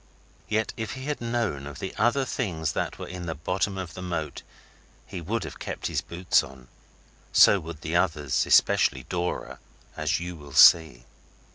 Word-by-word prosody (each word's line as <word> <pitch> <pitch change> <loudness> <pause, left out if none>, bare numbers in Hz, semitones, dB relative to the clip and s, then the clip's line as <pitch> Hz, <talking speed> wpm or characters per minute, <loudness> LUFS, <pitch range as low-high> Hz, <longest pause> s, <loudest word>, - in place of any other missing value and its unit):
Yet 110 +1 0
if 110 -1 -4
he 130 - -7
had 150 -3 -3
known 115 - -2
of 70 - -9
the 95 - -6
other 125 +4 +2
things 85 - -2
that - - -3
were - - -7
in 90 -1 -7
the 80 - -3
bottom 90 +5 -2
of 95 -3 -6
that 90 - -8
moat 85 -4 -4 0.6
he 95 -3 -7
would 110 +8 -2
have - - -8
kept - - -6
his - - -1
boots 90 +1 +1
on. 65 -2 -13 0.6
So 100 - +7
would 80 -2 -9
the 80 +2 -3
others, 80 -7 +1
especially 65 -1 +4
Dora, 90 +3 -4 0.4
as 75 -1 0
you 90 +1 -6
will 70 -3 -12
see. 80 -4 +6
85 Hz, 175 wpm, -26 LUFS, 75-100 Hz, 0.6 s, So